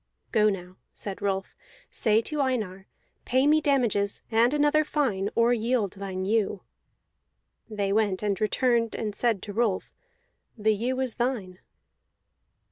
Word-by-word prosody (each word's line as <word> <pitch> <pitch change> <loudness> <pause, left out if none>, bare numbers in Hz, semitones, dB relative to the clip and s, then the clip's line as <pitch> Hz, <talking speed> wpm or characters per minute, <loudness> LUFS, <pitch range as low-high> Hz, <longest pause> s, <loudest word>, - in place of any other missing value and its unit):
"Go 215 -2 +4
now," 185 -2 -6 0.2
said 195 -2 -6
Rolf. 195 -1 -2 0.4
"Say 220 -1 +2
to 300 +5 -2
Einar: 210 -8 -2 0.4
'Pay 260 +2 +2
me 305 +1 +4
damages 235 -9 +1
and 230 +2 +4
another 295 +1 +3
fine, 230 -11 0
or 235 +1 +4
yield 230 -3 0
thine 190 -1 -5
ewe.'" 205 -2 0 1.1
They 200 -2 -1
went 210 -2 +1
and 200 -2 -1
returned, 230 +1 +1
and 210 -2 -3
said 225 -2 0
to 205 - -6
Rolf: 215 -3 0 0.6
"The 215 0 +2
ewe 245 +5 -2
is 255 -3 -1
thine." 225 -8 -2
220 Hz, 135 wpm, -27 LUFS, 200-250 Hz, 1.1 s, Go